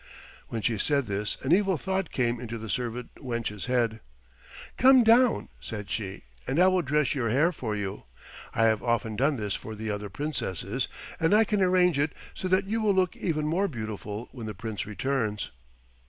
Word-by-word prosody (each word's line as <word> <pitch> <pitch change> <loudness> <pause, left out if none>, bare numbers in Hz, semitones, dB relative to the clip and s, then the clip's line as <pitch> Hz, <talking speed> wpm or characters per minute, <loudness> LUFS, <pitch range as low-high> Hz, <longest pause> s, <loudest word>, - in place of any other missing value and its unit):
When 115 -2 -4
she 115 -3 +1
said 140 +3 +2
this 105 0 -2
an 130 - 0
evil 190 0 +4
thought 190 +3 -1
came 120 -2 0
into 115 -1 -5
the 110 -2 -5
servant 120 +1 -3
wench's 115 -5 -4
head. 120 -3 +1 0.8
"Come 260 0 +7
down," 230 - +4
said 100 - -6
she, 95 -3 -4 0.2
"and 135 - 0
I 180 - +6
will 185 -1 +2
dress 150 -1 +1
your 120 -5 0
hair 150 +9 +3
for 110 -10 -3
you; 100 -7 -4 0.5
I 115 - +1
have 110 -1 +3
often 115 -2 0
done 140 +6 +2
this 105 -5 -2
for 110 - -6
the 110 0 -3
other 105 0 -4
Princesses, 125 - -2 0.3
and 165 +4 +4
I 220 - +6
can 210 -2 0
arrange 180 -4 +4
it 145 +1 +1 0.2
so 185 - -4
that 185 +2 +3
you 220 +3 -1
will 205 -2 +3
look 185 -2 +2
even 155 -4 -1
more 175 +6 +1
beautiful 110 - -5
when 120 -4 -7
the 105 - -5
Prince 110 +1 -4
returns." 110 -1 -1
125 Hz, 190 wpm, -28 LUFS, 110-175 Hz, 0.8 s, Come